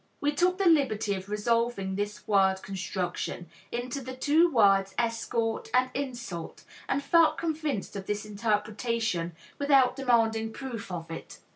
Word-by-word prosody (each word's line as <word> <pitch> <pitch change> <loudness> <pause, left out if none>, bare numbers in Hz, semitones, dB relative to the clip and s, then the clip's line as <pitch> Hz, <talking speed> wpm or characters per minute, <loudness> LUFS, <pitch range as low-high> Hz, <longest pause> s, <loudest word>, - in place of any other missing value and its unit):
We 290 - +1
took 360 +5 +2
the 395 - 0
liberty 260 - +3
of 190 0 -6
resolving 210 -2 0
this 205 +1 -4
word 190 -2 +3
construction 180 -2 -4 0.2
into 245 +3 -3
the 260 0 -7
two 310 +6 +4
words 195 -5 +4
"escort" 230 -1 -1
and 255 0 +3
"insult," 240 -11 -5 0.3
and 280 - 0
felt 335 +1 +4
convinced 310 -11 -2
of 195 -1 -6
this 210 +1 -2
interpretation 210 -3 -1 0.3
without 275 -3 +4
demanding 225 -4 +1
proof 240 -7 -6
of 165 -2 -5
it. 165 - -8
230 Hz, 140 wpm, -28 LUFS, 200-265 Hz, 0.3 s, two